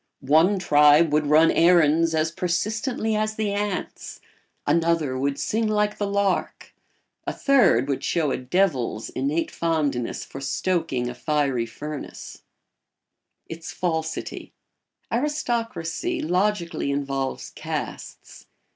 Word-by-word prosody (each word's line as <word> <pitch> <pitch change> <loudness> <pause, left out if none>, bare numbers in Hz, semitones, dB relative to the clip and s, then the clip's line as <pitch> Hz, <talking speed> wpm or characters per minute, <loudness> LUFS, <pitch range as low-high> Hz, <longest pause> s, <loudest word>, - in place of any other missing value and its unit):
One 180 +6 +5
tribe 150 -2 +5
would 150 -1 +2
run 155 +2 +5
errands 165 -1 +4
as 160 +1 +1
persistently 215 +6 -1
as 215 0 -1
the 215 -2 -1
ants; 205 -2 -4 0.5
another 165 -5 +1
would 140 +1 -1
sing 220 +1 0
like 210 -1 0
the 205 - 0
lark; 200 -1 -1 0.5
a - - 0
third 225 - +3
would 140 -2 -2
show 160 -5 0
a - - -1
devil's 130 - 0
innate 145 +5 -1
fondness 150 -8 -1
for 135 - -9
stoking 150 -4 -1
a 125 - -4
fiery 140 -4 0
furnace. 150 +5 -8 1.0
[Sidenote: 165 - -8
Its 160 - -8
falsity.] 160 -2 -3 0.6
Aristocracy 240 - -2
logically 185 - 0
involves 135 -1 -3
castes. - - -7
165 Hz, 115 wpm, -24 LUFS, 145-200 Hz, 1.0 s, One